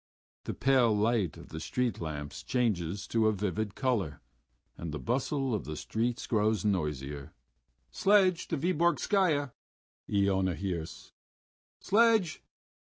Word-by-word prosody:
The - - -4
pale 125 -5 +3
light 105 -5 +1
of - - -12
the 80 - -6
street 120 +3 -2
lamps 75 -3 -5
changes 100 -7 -1
to 110 -1 +2
a - - +4
vivid 105 0 -2
color, 105 - -1 0.6
and 85 -2 -6
the 75 - -3
bustle 135 - -1
of 105 - -2
the 75 - -5
street 120 +2 -2
grows 105 -3 +1
noisier. 75 -7 -2 0.6
"Sledge 190 -3 +3
to 165 - -1
Vyborgskaya!" 170 -2 +2 0.6
Iona 95 -3 +2
hears. 85 -2 -5 0.7
"Sledge!" 220 -5 +3
110 Hz, 120 wpm, -30 LUFS, 90-135 Hz, 0.7 s, a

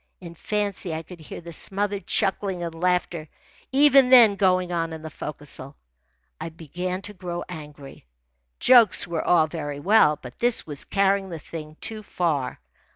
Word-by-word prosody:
In 170 -2 -10
fancy 200 -2 -2
I 160 - -5
could 175 +2 -12
hear 155 - -9
the 170 0 -10
smothered 200 +3 -2
chuckling 190 -2 -1
and 170 -1 -4
laughter 175 -2 -1 0.4
even 275 -1 +5
then 240 -5 +8
going 185 -2 +2
on 165 -1 -2
in 160 -1 -8
the 160 - -7
forecastle. 145 -2 -7 0.6
I - - -5
began 180 +4 -5
to 210 - -7
grow 175 -2 -5
angry. 150 - -11 0.5
Jokes 240 -4 +6
were 170 -2 -3
all 165 -3 +4
very 145 -3 -5
well, 165 -3 +4
but 125 -1 -12
this 240 -1 +1
was 145 -3 -6
carrying 195 -1 +1
the 170 - -6
thing 155 0 -9
too 220 -1 -3
far. 165 -9 -2
175 Hz, 160 wpm, -24 LUFS, 155-200 Hz, 0.6 s, then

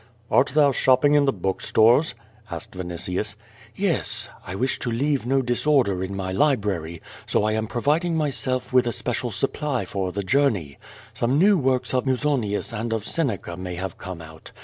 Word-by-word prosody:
^Art 130 0 +3
thou 145 -2 +5
shopping 130 +3 +3
in 145 -1 +5
the 135 - +3
book 95 -3 -3
stores?" 120 +6 +4 0.3
asked 85 -2 -7
Vinitius. 90 +3 -3 0.4
'Yes. 120 - -1 0.2
I 90 - -5
wish 125 +6 -1
to - - -2
leave 135 +1 0
no 135 +1 +2
disorder 120 -6 +2
in 95 +1 -4
my 95 -1 -3
library, 95 - 0 0.2
so - - +1
I 110 - +1
am 110 0 -1
providing 150 - 0
myself 130 -4 -2
with 125 -1 +4
a - - +1
special - - -2
supply 145 -4 -1
for 95 -2 -3
the 100 +2 -3
journey. 100 - +1 0.3
Some 125 +4 +1
new 200 +5 +5
works 130 -6 0
of 130 +1 0
Musonius 130 -6 0
and 115 +1 -3
of 110 -2 -2
Seneca 115 - -1
may 90 0 -5
have 90 0 -5
come 90 -3 -7
out. 80 0 -12
120 Hz, 175 wpm, -24 LUFS, 95-140 Hz, 0.4 s, thou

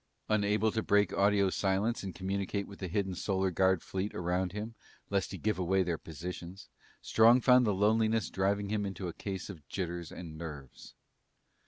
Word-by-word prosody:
Unable 110 +1 +2
to 110 - -1
break 105 -3 +2
audio 100 -1 +3
silence 100 +5 0
and 95 -2 -6
communicate 100 +1 -2
with 100 - -12
the 95 - -3
hidden 95 +2 -1
Solar 95 +1 0
Guard 95 0 +2
fleet 95 +2 -3
around 90 +1 -1
him, 105 +3 -5 0.4
lest 100 -2 0
he - - -5
give 105 -2 -1
away 95 +1 +2
their 85 -3 -2
positions, 90 +3 -8 0.3
Strong 115 +3 +5
found 125 -1 +5
the - - +3
loneliness 110 +1 +2
driving 100 +2 0
him 105 -1 0
into 95 -2 -4
a 85 - -5
case 95 0 -5
of 80 -9 -10
jitters 85 -2 -4
and 80 -3 -8
nerves. 75 -5 -9
95 Hz, 175 wpm, -31 LUFS, 90-105 Hz, 0.4 s, Strong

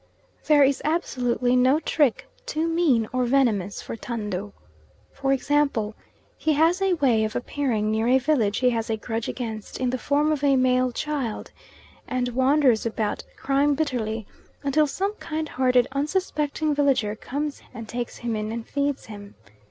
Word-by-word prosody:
There 295 -2 +6
is 275 0 +2
absolutely 250 -6 0
no 260 +4 +4
trick 295 -5 +1 0.2
too 325 -8 -1
mean 320 -10 +2
or 255 -1 +1
venomous 230 -7 +1
for - - -6
Tando. 210 -4 -4 0.6
For 270 0 -1
example, 275 -5 +1 0.5
he 315 - +2
has 330 +5 +3
a 385 -2 +3
way 250 -8 +2
of 215 +1 -3
appearing 240 -6 -1
near 220 +1 0
a 255 +2 +5
village 255 -7 +1
he 250 -1 +3
has 225 -1 -2
a 220 - 0
grudge 225 0 -4
against 220 -4 -5
in 255 -1 0
the 255 - -2
form 295 +3 +1
of 295 -2 -1
a 280 -1 +4
male 255 -1 +2
child, 270 -4 -3 0.6
and 255 -1 -1
wanders 260 -1 +3
about 220 -2 -2
crying 280 +1 +2
bitterly, 230 -7 -2 0.4
until 295 +2 +3
some 390 +8 -2
kind 315 -1 -3
hearted, 255 -3 +2
unsuspecting 300 0 -1
villager 270 -7 +1
comes 285 +6 -4
and 225 0 -8
takes 240 +1 -5
him 235 -2 -3
in 215 0 -3
and 230 0 -5
feeds 285 -1 -2
him. 205 -2 -10
255 Hz, 160 wpm, -24 LUFS, 225-290 Hz, 0.6 s, There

